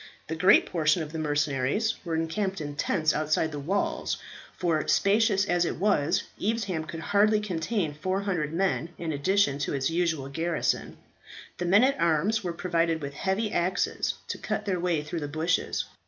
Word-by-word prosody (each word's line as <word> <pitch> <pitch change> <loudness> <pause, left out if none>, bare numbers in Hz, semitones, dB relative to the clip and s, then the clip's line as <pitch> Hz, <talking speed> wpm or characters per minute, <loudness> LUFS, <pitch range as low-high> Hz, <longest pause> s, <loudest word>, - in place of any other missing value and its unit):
The 160 - -2
great 180 +3 +5
portion 160 0 +1
of 150 - -8
the 160 - -4
mercenaries 145 - 0
were 170 -3 -2
encamped 190 +4 -1
in 145 -2 -5
tents 155 +1 +1
outside 155 +1 0
the 145 - -5
walls, 190 +8 -1 0.4
for, 165 -4 0
spacious 205 0 +3
as 175 -3 +2
it - - -1
was, 190 -2 +1 0.2
Evesham 200 -7 -1
could 165 +1 -7
hardly 210 +4 +3
contain 185 -3 -2
400 185 -1 -2
men 175 -1 0
in 165 -2 -3
addition 145 0 +1
to 140 - -1
its 135 +3 0
usual 165 -5 0
garrison. 165 +4 -1 0.6
The 175 - -1
men 200 +6 +5
at 275 +1 +2
arms 175 +7 +2
were 175 - -2
provided 170 -1 0
with 140 -2 -6
heavy 195 +7 -1
axes 180 +2 0
to - - -4
cut - - -3
their 190 -3 0
way 170 -4 0
through 155 +3 -4
the 145 - -4
bushes. 160 +4 -1
170 Hz, 170 wpm, -27 LUFS, 155-195 Hz, 0.6 s, great